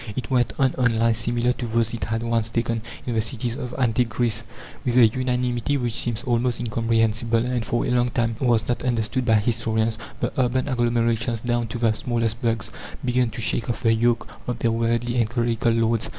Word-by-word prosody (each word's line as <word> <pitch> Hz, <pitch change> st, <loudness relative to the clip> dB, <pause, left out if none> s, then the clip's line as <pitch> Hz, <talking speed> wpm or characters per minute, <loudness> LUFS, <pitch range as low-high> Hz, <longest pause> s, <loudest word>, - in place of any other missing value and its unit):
It 130 Hz, 0 st, -4 dB
went 125 Hz, -2 st, +2 dB
on 135 Hz, -1 st, +3 dB
on 120 Hz, -3 st, +2 dB
lines 115 Hz, 0 st, +2 dB
similar 120 Hz, +2 st, +1 dB
to 120 Hz, -, -5 dB
those 115 Hz, 0 st, 0 dB
it 115 Hz, -, -3 dB
had 115 Hz, +1 st, -2 dB
once 115 Hz, -1 st, +1 dB
taken 115 Hz, 0 st, -1 dB, 0.2 s
in 120 Hz, -, -2 dB
the 110 Hz, -, +2 dB
cities 115 Hz, +1 st, -2 dB
of 125 Hz, -1 st, -6 dB
antique 120 Hz, -2 st, +1 dB
Greece. 110 Hz, -1 st, 0 dB, 0.4 s
With 125 Hz, -1 st, 0 dB
a 120 Hz, -, +8 dB
unanimity 125 Hz, +2 st, 0 dB
which 120 Hz, -3 st, -2 dB
seems 115 Hz, -1 st, -1 dB
almost 120 Hz, -1 st, 0 dB
incomprehensible, 115 Hz, 0 st, +1 dB
and 125 Hz, -2 st, -1 dB
for 120 Hz, +1 st, -1 dB
a -, -, -1 dB
long 125 Hz, 0 st, +2 dB
time 115 Hz, -1 st, 0 dB
was 120 Hz, -4 st, +2 dB
not 120 Hz, -, -1 dB
understood 120 Hz, 0 st, 0 dB
by 110 Hz, -2 st, +4 dB
historians, 110 Hz, 0 st, 0 dB, 0.2 s
the -, -, -2 dB
urban 130 Hz, +1 st, 0 dB
agglomerations, 120 Hz, -2 st, +1 dB
down 120 Hz, -1 st, 0 dB
to 110 Hz, -, -5 dB
the 115 Hz, -2 st, +2 dB
smallest 115 Hz, 0 st, -1 dB
burgs, 115 Hz, -2 st, -1 dB, 0.3 s
began 125 Hz, -1 st, +2 dB
to 115 Hz, +1 st, -6 dB
shake 115 Hz, +1 st, 0 dB
off 120 Hz, -, -3 dB
the 115 Hz, -1 st, +4 dB
yoke 115 Hz, +1 st, +1 dB, 0.2 s
of 125 Hz, -1 st, -2 dB
their 115 Hz, 0 st, +1 dB
worldly 115 Hz, +1 st, 0 dB
and 115 Hz, -3 st, +2 dB
clerical 120 Hz, -1 st, +1 dB
lords. 115 Hz, 0 st, +1 dB
115 Hz, 205 wpm, -23 LUFS, 115-120 Hz, 0.4 s, a